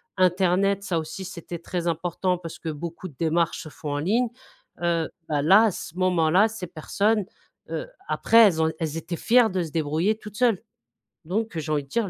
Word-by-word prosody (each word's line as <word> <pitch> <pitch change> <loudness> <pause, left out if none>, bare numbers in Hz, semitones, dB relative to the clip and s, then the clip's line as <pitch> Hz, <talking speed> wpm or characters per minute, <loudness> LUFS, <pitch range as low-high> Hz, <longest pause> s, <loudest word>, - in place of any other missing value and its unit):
internet. 185 +2 +2
Ça 180 -4 -1
aussi, 160 +4 -5
c'était 170 -2 -7
très 175 0 -4
important 175 +2 0
parce 165 -2 -8
que 160 - -5
beaucoup 170 +4 -6
de 140 - -19
démarches 165 +1 +1
se - - -10
font 150 0 -6
en - - -1
ligne, 225 +9 +1 0.5
heu, 170 -2 +1 0.2
bah, 145 -2 0
là, 195 +9 +7
à 215 - +2
ce 175 +1 -8
moment-là, 185 +2 +4
ces 210 -5 -6
personnes, 205 +6 0 0.4
heu, - - -4 0.2
après 230 - +2
elles 160 -4 +1
ont 160 0 +2
elles 160 -1 -2
étaient 170 +1 -5
fières 235 -1 +4
de 185 -1 -1
se 160 - -7
débrouiller 160 +7 0
toutes 210 -1 -11
seules 235 -7 +2 0.6
donc, 205 0 -2
j'ai 155 0 -2
envie 145 -1 0
de 135 - -21
dire, 225 -1 0
175 Hz, 200 wpm, -25 LUFS, 160-200 Hz, 0.6 s, là